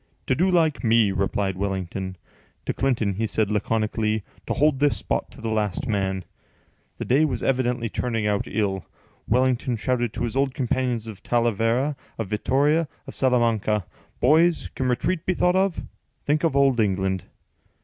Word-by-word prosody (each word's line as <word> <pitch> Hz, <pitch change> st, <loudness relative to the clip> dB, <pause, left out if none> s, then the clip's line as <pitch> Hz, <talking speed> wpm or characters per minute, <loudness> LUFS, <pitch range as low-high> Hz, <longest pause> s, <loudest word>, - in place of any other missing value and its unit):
"To -, -, +2 dB
do 180 Hz, +8 st, +2 dB
like 160 Hz, -5 st, +2 dB
me," 115 Hz, -3 st, +4 dB
replied 95 Hz, 0 st, -1 dB
Wellington. 95 Hz, -1 st, -3 dB, 0.5 s
To -, -, -1 dB
Clinton 120 Hz, -7 st, 0 dB
he 110 Hz, +4 st, -1 dB
said 105 Hz, 0 st, 0 dB
laconically, 110 Hz, 0 st, 0 dB, 0.2 s
"To -, -, 0 dB
hold 145 Hz, -1 st, +3 dB
this 145 Hz, 0 st, +3 dB
spot -, -, -2 dB
to 135 Hz, -, -14 dB
the 115 Hz, -, -3 dB
last 105 Hz, -1 st, -1 dB
man." 95 Hz, -4 st, -1 dB, 0.7 s
The -, -, -4 dB
day 135 Hz, +5 st, +3 dB
was 130 Hz, -7 st, -1 dB
evidently 125 Hz, -2 st, +1 dB
turning 115 Hz, -1 st, -2 dB
out 105 Hz, -1 st, 0 dB
ill. 100 Hz, -3 st, -1 dB, 0.4 s
Wellington 125 Hz, +1 st, +1 dB
shouted 120 Hz, 0 st, 0 dB
to -, -, -3 dB
his 120 Hz, 0 st, -2 dB
old 135 Hz, -1 st, +1 dB
companions 125 Hz, -3 st, -1 dB
of 105 Hz, -4 st, -8 dB
Talavera, 120 Hz, +4 st, +1 dB, 0.2 s
of 115 Hz, -, -2 dB
Vittoria, 145 Hz, +9 st, +2 dB, 0.2 s
of -, -, -9 dB
Salamanca: 115 Hz, -6 st, +1 dB, 0.3 s
"Boys, 160 Hz, +6 st, +3 dB
can 130 Hz, -, -2 dB
retreat 155 Hz, +7 st, 0 dB
be 185 Hz, -, +2 dB
thought 180 Hz, +1 st, +2 dB
of? 190 Hz, -2 st, +1 dB, 0.4 s
Think 150 Hz, +2 st, +1 dB
of 160 Hz, -5 st, +1 dB
old 135 Hz, -3 st, +4 dB
England!" 95 Hz, -3 st, 0 dB
120 Hz, 160 wpm, -24 LUFS, 105-135 Hz, 0.7 s, me